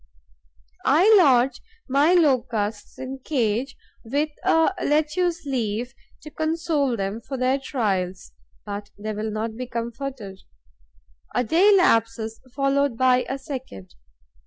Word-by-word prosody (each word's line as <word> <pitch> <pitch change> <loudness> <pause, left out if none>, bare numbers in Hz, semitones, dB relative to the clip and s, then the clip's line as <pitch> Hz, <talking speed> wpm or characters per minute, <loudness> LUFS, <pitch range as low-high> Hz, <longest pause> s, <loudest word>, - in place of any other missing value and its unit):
I 365 +11 +6
lodge 260 -8 +4 0.3
my 285 +6 +3
Locusts 235 - 0
in 265 +1 -6
cages, 250 -1 -1 0.3
with 285 +6 -1
a 325 +4 +3
lettuce 315 +3 0
leaf 240 -2 -2 0.3
to 305 - -10
console 315 -5 0
them 200 +3 -3
for 265 +3 -6
their 255 +2 +1
trials; 190 - -2 0.3
but 205 0 -6
they 215 +1 -4
will 215 +1 -3
not 220 +1 -3
be 250 +2 -5
comforted. 235 -4 -6 1.0
A 245 - +2
day 340 - +4
elapses, 230 - +2
followed 275 -1 +1
by 255 0 +3
a 270 - -2
second. 260 - -8
255 Hz, 120 wpm, -24 LUFS, 225-290 Hz, 1.0 s, I